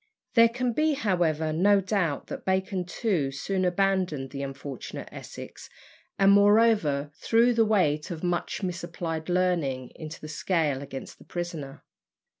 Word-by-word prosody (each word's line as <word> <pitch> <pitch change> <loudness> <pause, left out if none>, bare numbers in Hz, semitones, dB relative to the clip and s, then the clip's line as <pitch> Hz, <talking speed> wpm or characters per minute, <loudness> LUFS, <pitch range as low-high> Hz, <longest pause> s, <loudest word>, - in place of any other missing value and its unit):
There 230 -1 +7
can 245 +1 -1
be, 310 +5 +2
however, 165 - 0
no 200 +5 +4
doubt 185 -6 -1
that 270 -2 -7
Bacon 190 -1 0
too 175 - 0
soon 185 +8 -2
abandoned 180 -7 0
the 140 - -5
unfortunate 140 -1 -6
Essex, - - -10 0.5
and, 195 0 +5
moreover, 200 -9 +4
threw 235 +2 +3
the 230 -1 +3
weight 160 -9 +1
of 170 -2 -6
much 175 +3 -2
misapplied 170 -2 -4
learning 170 -9 0
into 155 0 -8
the 155 - -8
scale 155 -3 0
against 135 -1 -8
the - - -14
prisoner. 165 -6 -6
175 Hz, 140 wpm, -27 LUFS, 150-200 Hz, 0.5 s, There